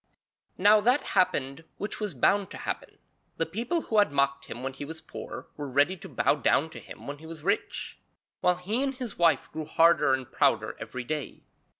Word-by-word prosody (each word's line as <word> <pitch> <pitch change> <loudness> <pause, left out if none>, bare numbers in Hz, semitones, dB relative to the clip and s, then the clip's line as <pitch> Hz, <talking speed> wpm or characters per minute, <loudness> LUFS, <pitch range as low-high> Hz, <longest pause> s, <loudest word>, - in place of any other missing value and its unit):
Now 210 +2 +6
that 250 +6 +3
happened 145 -6 +1
which 205 - -4
was 210 -7 -3
bound 195 +9 +3
to - - -8
happen. - - -5 0.4
The 165 - +1
people 235 - -2
who 220 -7 +1
had 205 -7 +4
mocked 140 0 +1
him 120 - -8
when 135 0 -3
he 135 - -7
was 160 +2 -7
poor - - -8
were 145 -2 -5
ready 145 +8 +3
to - - -10
bow - - +2
down 150 +2 +2
to - - -8
him - - -12
when 140 0 -6
he 160 - -11
was 160 -2 -9
rich, 200 +4 -1 0.4
while 180 - +3
he 200 +8 -1
and 275 -1 0
his 250 -7 -6
wife 170 -1 +3
grew 155 -1 -5
harder 155 -3 +4
and 130 -2 -8
prouder - - +2
every 125 -1 -5
day. 150 +3 -4
165 Hz, 205 wpm, -28 LUFS, 140-205 Hz, 0.4 s, Now